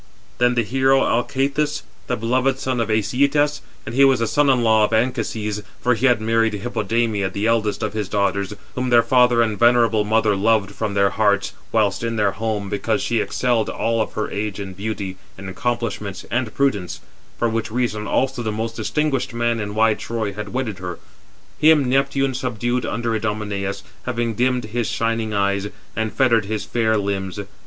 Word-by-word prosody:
Then 120 0 +3
the 120 - +2
hero 135 +4 +3
Alcathous, 140 +5 0 0.2
the - - -1
beloved 125 +4 +1
son 130 -2 -2
of 115 -1 -1
Æsyetas 140 +7 +1 0.2
(and - - -6
he 135 +3 +4
was 135 -2 +5
the 115 - +1
son 145 +4 +2
in 125 -3 +3
law 110 -1 +4
of 105 - +1
Anchises, 110 -2 -1 0.2
for 125 - +2
he 125 +4 +2
had 120 -4 +3
married 115 0 +1
Hippodamia, 110 -1 -1
the 100 +2 -3
eldest 110 -2 +1
of 110 - -2
his 105 -3 -3
daughters, 100 -1 0 0.2
whom 125 0 -2
her 120 -1 +5
father 125 -2 +4
and 110 -2 -2
venerable 115 -2 +4
mother 110 -1 +2
loved 105 0 +2
from 100 +1 -3
their 100 -1 +3
hearts, 100 -2 +1 0.2
whilst 105 -3 +1
in 115 0 -2
their 105 -3 +2
home, 105 0 -3
because 100 +1 -1
she 120 -1 0
excelled 120 -3 0
all 115 0 0
of - - -3
her 110 - -3
age 105 0 -3
in 95 -1 -6
beauty, 100 -1 -4 0.2
in 95 0 -8
accomplishments, 105 -1 -3
and 120 -2 -1
prudence, 105 -10 0 0.4
for 120 - +1
which 115 0 -2
reason 110 -2 -2
also 130 +4 0
the 110 -2 -2
most 115 +2 -3
distinguished 130 +1 -1
man 120 0 0
in 105 -1 -4
wide 110 0 +3
Troy 110 -3 -3
had 105 0 -6
wedded 120 -6 -3
her), 90 -2 -5 0.6
him 155 -3 +5
Neptune 135 +1 +1
subdued 125 -1 -2
under 115 +1 -2
Idomeneus, 105 -2 -3 0.2
having 120 -2 -1
dimmed 125 +2 +1
his 110 +1 -2
shining 115 -1 -1
eyes, 100 -1 0 0.3
and 110 -1 -1
fettered 115 -1 +3
his 105 0 -3
fair 110 -2 +1
limbs. 100 -1 -2
115 Hz, 180 wpm, -21 LUFS, 105-125 Hz, 0.6 s, was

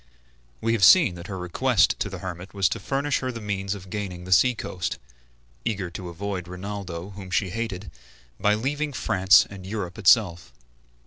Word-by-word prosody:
We 115 - +1
have 110 -4 0
seen 165 - +7
that 85 +1 -9
her 95 - -5
request 90 -1 +2
to - - -1
the - - -6
hermit 90 +1 -7
was 100 -2 +3
to - - -3
furnish 140 +1 -1
her 130 -1 -3
the 115 - -7
means 100 -2 -3
of 95 -2 -11
gaining 95 -4 -4
the 90 - -8
sea 125 +7 +5
coast, 90 -5 -4 0.7
eager 100 -6 -2
to 90 +1 -7
avoid 90 +1 -5
Rinaldo, 90 -1 -6
whom 95 -1 -9
she 90 +1 0
hated, 105 -3 -4 0.5
by 105 +1 +3
leaving 145 +6 -2
France 95 -4 +4
and 100 -2 -10
Europe 95 -2 -5
itself. 90 - +3
95 Hz, 180 wpm, -25 LUFS, 90-110 Hz, 0.7 s, seen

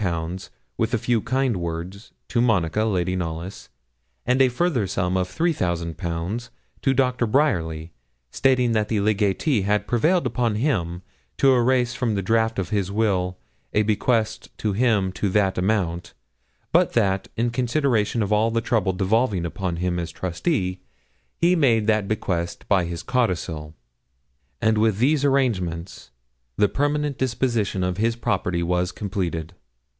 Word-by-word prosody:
with - - +1
a - - +2
few 120 -3 0
kind 130 -3 0
words, 85 +4 -5 0.2
to 120 - +1
Monica, 105 -3 +2
Lady 90 -4 0
Knollys, 85 +1 -5 0.6
and 125 +2 +3
a 130 - +5
further 125 - 0
sum 90 -1 -1
of 95 -1 +1
3,000_l_. 90 - -2 0.3
to 135 - +2
Dr. 125 -2 +1
Bryerly, 85 - 0 0.4
stating 130 -3 +2
that 110 -2 +1
the 110 -1 0
legatee 105 - +1
had 105 +2 +1
prevailed 155 +8 +2
upon 120 -2 0
him 90 - -1 0.3
to 135 -1 +5
erase 125 0 +2
from 120 -4 -1
the 100 - -1
draft 110 +2 +1
of 95 - -2
his 100 -3 0
will 95 -4 0 0.4
a 105 - +3
bequest 110 +1 0
to 105 -2 -1
him 105 -4 +2
to 100 +2 -2
that 95 -1 +1
amount, 90 -3 -1 0.6
but - - +3
that, 100 -4 +1
in 120 +1 +1
consideration 120 -3 +1
of 105 +1 0
all 110 +2 +3
the 115 0 0
trouble 110 -5 0
devolving 100 0 +1
upon 90 0 -3
him 90 0 -1
as 85 0 -4
trustee, 90 - -2 0.6
he 175 +2 +3
made 120 -9 +3
that 110 -2 +2
bequest 90 -5 -2
by 95 -3 +3
his 85 0 -5
codicil; 85 - -1 0.8
and 110 -1 +2
with 110 -2 +2
these 140 +5 +2
arrangements 95 - -1 0.5
the 105 - +4
permanent 145 +2 -1
disposition 120 -6 0
of 90 0 -1
his 115 +2 +1
property 90 -6 -1
was 90 +1 0
completed. 90 -4 -3
105 Hz, 145 wpm, -23 LUFS, 90-120 Hz, 0.8 s, a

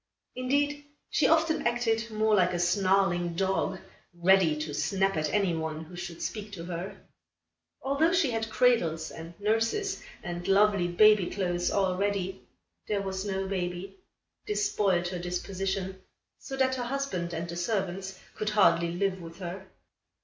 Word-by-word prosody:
Indeed, 285 +3 0 0.3
she - - +3
often 320 -3 +3
acted 230 -1 0
more 215 0 +1
like 180 -3 +4
a - - -1
snarling 180 -1 +2
dog, 190 +1 0 0.4
ready 175 -3 +4
to 150 -1 -6
snap 195 +6 +1
at 155 -1 0
any 195 -5 +2
one 160 -1 -3
who 175 +3 -12
should 175 -1 -6
speak 210 -1 -5
to 170 -3 -6
her. 175 +2 -5 0.9
Although 280 +5 +2
she 335 -7 +2
had 225 -1 -2
cradles 175 -11 +2
and 165 +1 -10
nurses 225 - 0 0.2
and 175 0 -5
lovely 200 -2 +4
baby 205 +1 +5
clothes 175 -3 -1
all 190 -2 +1
ready, 195 -1 -2 0.4
there 205 -2 0
was 190 0 -3
no 195 -1 -2
baby. 185 - -4 0.5
This 415 -1 0
spoiled 180 - +1
her 180 -1 -4
disposition, 190 +2 -3 0.4
so 270 - -7
that 260 -1 +2
her 250 -2 -2
husband 240 -10 -2
and 170 0 -3
the 170 - -6
servants 190 0 -2
could 215 - -2
hardly 170 -5 +3
live 190 0 -1
with 165 0 -10
her. 185 +1 -7
195 Hz, 155 wpm, -29 LUFS, 175-220 Hz, 0.9 s, baby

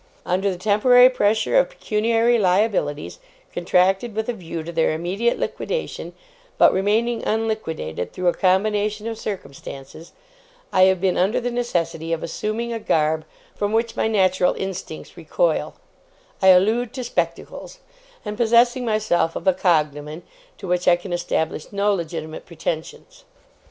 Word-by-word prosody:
Under 190 +3 0
the 185 - -3
temporary 245 +6 +5
pressure 220 - +2
of - - +1
pecuniary 230 - +1
liabilities, 180 - 0 0.3
contracted 190 +5 +1
with 220 0 -2
a - - 0
view 170 -5 -6
to 170 - -7
their 160 -1 +1
immediate 190 +9 -1
liquidation, 485 - -4 0.4
but - - +6
remaining 220 +5 0
unliquidated 190 - -3
through 180 -1 -3
a 175 - +4
combination 210 +3 +1
of 225 -1 -4
circumstances, 155 -5 -8 0.6
I 185 - +6
have 190 -1 +3
been 185 0 +1
under 190 +5 +2
the 245 +1 -3
necessity 170 -9 -2
of 165 - -3
assuming 220 +7 -3
a 230 - -3
garb 155 -4 0 0.3
from 205 +1 -2
which 230 +1 0
my - - 0
natural 185 -4 +2
instincts 190 -1 -6
recoil - - -1 0.7
I 190 - +4
allude 220 +6 +4
to 255 - -4
spectacles 245 - -4 0.5
and 210 0 -4
possessing 240 +2 +3
myself 215 -7 0
of - - -6
a 190 - +4
cognomen, 155 -3 0 0.3
to 195 - -8
which 180 0 -1
I 175 - +7
can 175 +1 -7
establish 160 -3 -2
no 205 0 +1
legitimate 160 -3 -5
pretensions. 170 - -6
195 Hz, 145 wpm, -22 LUFS, 175-225 Hz, 0.7 s, I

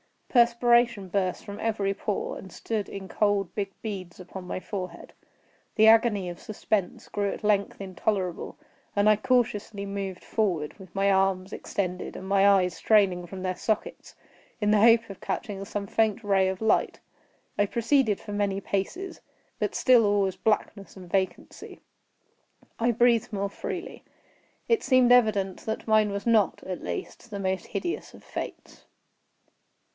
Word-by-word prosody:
Perspiration 235 -4 +3
burst 185 -1 -1
from 205 -1 -7
every 205 -3 0
pore, 205 +1 -3
and 190 - -10
stood 215 +1 -3
in 190 -1 -8
cold 205 -2 +1
big 200 -2 -3
beads 190 -6 -6
upon 185 0 -9
my 185 - -3
forehead. 185 -5 -6 0.6
The 220 0 +6
agony 220 -4 +5
of 175 - -8
suspense 210 -3 -2
grew 200 -1 -1
at - - -7
length 205 -1 +1
intolerable, 190 -1 -2 0.4
and 205 +1 +4
I 215 - +5
cautiously 215 -3 0
moved 195 -2 -5
forward, 180 -9 -1
with 185 -2 -14
my 195 0 +3
arms 190 0 +1
extended, 180 -2 -4
and 190 - -7
my 195 0 +4
eyes 185 -3 +4
straining 185 -5 +2
from 185 +1 -7
their 185 -1 -2
sockets, 230 - -3 0.5
in 210 0 +2
the 210 - +5
hope 230 +1 +6
of 195 - -9
catching 200 -4 -4
some 200 0 -4
faint 220 +2 +1
ray 195 -2 +3
of 190 +1 -3
light. 220 - +1 0.6
I 205 - +5
proceeded 230 0 +1
for - - -9
many 200 -1 0
paces; 275 - -3 0.4
but - - -1
still 245 -4 +5
all 205 0 +3
was 190 -2 -1
blackness 210 -2 -1
and 180 -3 -12
vacancy. 190 -2 -3 1.0
I 235 +1 +3
breathed 235 -1 +2
more 200 0 -1
freely. - - -6 0.6
It 460 - +3
seemed 255 -2 +4
evident 210 -6 +3
that 220 +1 -4
mine 215 -1 +4
was 200 0 -4
not, 225 -4 +2
at 185 -1 -5
least, 90 - -6
the 205 -2 -5
most 190 -2 -2
hideous 345 - -4
of - - -16
fates. - - -8
200 Hz, 155 wpm, -27 LUFS, 190-220 Hz, 1.0 s, The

